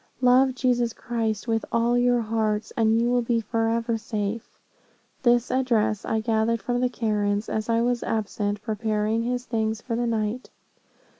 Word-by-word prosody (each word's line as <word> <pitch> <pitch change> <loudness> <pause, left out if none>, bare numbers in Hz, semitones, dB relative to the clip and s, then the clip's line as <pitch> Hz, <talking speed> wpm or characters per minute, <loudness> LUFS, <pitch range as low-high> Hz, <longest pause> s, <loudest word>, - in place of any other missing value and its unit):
Love 255 +1 +4
Jesus 245 -2 +1
Christ 225 -2 -3
with 225 -1 0
all 235 +1 +2
your 245 0 +3
hearts, 215 -1 -1
and 225 0 +3
you 235 - +2
will 245 0 +2
be 235 0 +1
forever 230 +1 -1
safe.' 215 0 -4 0.6
This 240 -1 +3
address 225 -5 +1
I 220 0 0
gathered 220 -1 0
from 245 +2 -1
the 250 - +2
Karens, 210 -3 -1
as 215 +1 -3
I 230 0 +2
was 245 0 0
absent 205 -1 -2
preparing 215 +1 -1
his 245 +1 -2
things 220 -2 -1
for 230 0 -4
the 240 +1 0
night. 225 +2 -2
230 Hz, 160 wpm, -25 LUFS, 220-240 Hz, 0.6 s, Love